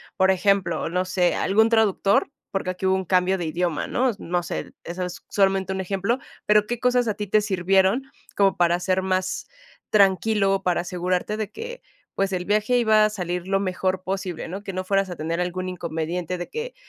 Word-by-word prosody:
Por 190 0 +4
ejemplo, 195 0 +1
no 180 +2 0
sé, 185 -1 +1
algún 220 +3 +3
traductor, 220 +3 +2 0.2
porque 195 -1 -2
aquí 185 +1 -4
hubo 190 0 +3
un 190 - -1
cambio 185 +1 +2
de 175 - -3
idioma, 170 0 -1
¿no? 255 +1 +1
No 175 +1 -1
sé, - - -5
eso 175 +2 -4
es 180 -1 -7
solamente 195 -1 +1
un 190 - -2
ejemplo, 195 +5 -1 0.3
pero, 210 0 +4
¿qué 240 +2 -3
cosas 250 -1 +2
a - - +1
ti 210 0 -4
te 210 +2 +3
sirvieron, 195 +3 +2 0.3
como 195 -1 +4
para 175 -1 +3
hacer 185 +1 0
más 185 0 -1 0.4
tranquilo, 195 -1 +3
para 180 -1 +1
asegurarte 180 +3 -2
de 215 -1 -3
que, 485 +2 -7 0.3
pues, 195 0 0
el 180 -1 -2
viaje 215 +5 +2
iba 220 -3 +5
a - - +2
salir 180 -3 -4
lo 195 0 +2
mejor 185 -1 -1
posible, 190 -3 -4
¿no? 190 +4 -6
Que 200 - -5
no 185 0 -3
fueras 195 0 +1
a 175 - -5
tener 165 +2 -2
algún 180 +1 -3
inconveniente 170 0 -3
de 175 - -5
que 460 +3 -6
190 Hz, 200 wpm, -24 LUFS, 180-210 Hz, 0.4 s, iba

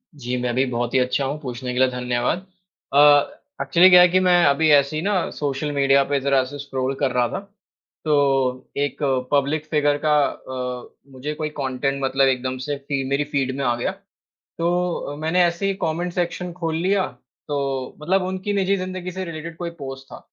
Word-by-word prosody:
जी, 125 -2 -3
मैं 120 -1 -1
भी 130 +1 +2
बहुत 120 -1 -2
ही 130 - +4
अच्छा 130 +2 0
हूँ। 145 +3 -3
पूछने 125 -1 -5
के 125 - -2
लिए 130 - +5
धन्यवाद। 125 +7 -1 0.5
अ, 140 - +3 0.6
एक्चुअली 180 +1 +5
क्या 180 -1 +9
है 180 - +8
कि 185 +2 +3
मैं 180 -1 +4
अभी 140 +3 +3
ऐसे 140 +1 +4
ही 155 - -1
ना, 195 0 0
सोशल 145 0 -3
मीडिया 140 -1 +3
पे 140 0 0
ज़रा-सा 135 0 0
स्क्रॉल 135 -1 -3
कर 135 -3 +1
रहा 125 -1 +2
था, - - -3 0.7
तो 135 -4 +1
एक 145 +1 -2 0.3
पब्लिक 145 +2 +1
फ़िगर 145 -1 +2
का 150 -1 +4
अ, 125 -1 -5 0.2
मुझे 135 +4 -5
कोई 155 0 -3
कॉन्टेंट 135 +1 -1
मतलब 135 0 +3
एकदम 130 0 -1
से 145 -1 -2
फी 140 -2 -1
मेरी 140 +1 +1
फ़ीड 130 -2 0
में 140 - -2
आ 120 -1 +2
गया। 120 - -2 0.7
तो 175 +1 0
अ, 145 - -5
मैंने 160 +4 +2
ऐसे 175 +3 -1
ही 195 - +1
कॉमेंट 170 +2 -2
सेक्शन 180 0 -2
खोल 165 -2 -3
लिया, 190 +3 +1 0.4
तो 135 -3 -3
मतलब 185 +5 +1
उनकी 190 +2 -3
निजी 200 0 +2
ज़िंदगी 185 0 -5
से 185 +1 -5
रिलेटेड 165 -1 -7
कोई 175 0 -4
पोस्ट 135 -1 -7
था। - - -9
145 Hz, 195 wpm, -22 LUFS, 130-170 Hz, 0.7 s, क्या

